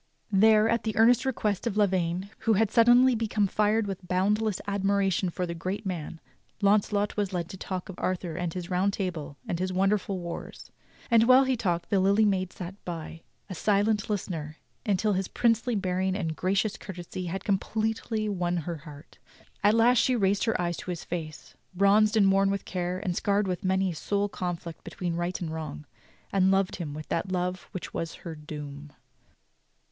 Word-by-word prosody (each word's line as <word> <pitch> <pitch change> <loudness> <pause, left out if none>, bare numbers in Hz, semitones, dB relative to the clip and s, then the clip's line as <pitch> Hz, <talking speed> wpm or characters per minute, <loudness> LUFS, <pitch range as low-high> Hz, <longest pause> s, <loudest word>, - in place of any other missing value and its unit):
There, 215 +2 +5
at 230 0 +1
the 220 -1 -3
earnest 245 +3 +5
request 215 -4 -1
of 210 -3 -2
Lavaine, 185 -1 +1
who 225 - +2
had 215 0 +2
suddenly 245 +2 +6
become 220 -2 +1
fired 210 +2 +2
with 190 -2 -6
boundless 205 +3 +1
admiration 200 -2 +1
for 180 +1 -3
the 170 - -4
great 185 +6 -4
man, 170 -3 -4 0.4
Launcelot 205 0 +2
was 205 -2 -1
led 175 -2 -1
on - - -21
to 190 - -8
talk 185 -1 -5
of 190 - -9
Arthur 180 -3 -2
and 175 -1 -2
his 180 0 -5
Round 185 +2 +1
Table 165 -8 -4
and 170 - -2
his 185 0 -1
wonderful 195 +1 +1
wars; 170 -1 -7 0.4
and 230 -1 +6
while 255 +1 +7
he 260 -1 +1
talked 175 -7 -2
the 200 - +4
Lily 200 +3 +4
Maid 185 -3 +1
sat 185 +2 -8
by, 165 -1 -6 0.3
a 190 - -6
silent 205 +3 +1
listener, 160 -7 -3 0.3
until 210 +1 +2
his 190 0 -1
princely 230 0 +1
bearing 190 -1 0
and 165 -5 -2
gracious 195 +4 0
courtesy 180 -1 -7
had 185 +2 -4
completely 215 +2 -1
won 180 -3 -1
her 170 -2 -3
heart. 150 -1 -13 0.4
At 205 +2 +5
last 235 +1 +5
she 255 - +3
raised 200 -2 +2
her 225 - 0
eyes 175 -1 -1
to - - -7
his 175 -2 -4
face, 160 -3 -6 0.2
bronzed 210 +3 +4
and 195 -2 +5
worn 195 0 +3
with 200 -1 -2
care, 180 -1 -2
and 185 -2 -2
scarred 200 +1 +1
with 180 +2 -3
many 190 0 +1
a - - -7
soul 200 +5 0
conflict 175 -3 -5
between 175 -3 -4
right 175 +1 -2
and 160 -3 -4
wrong, 155 - -6 0.5
"and 190 -1 +4
loved 195 -1 +1
him 155 -5 -5
with 155 0 -7
that 185 +3 -1
love 180 0 -2
which 185 - -6
was 165 0 -4
her 165 - -4
doom." 150 -1 -8
190 Hz, 190 wpm, -28 LUFS, 175-210 Hz, 0.5 s, while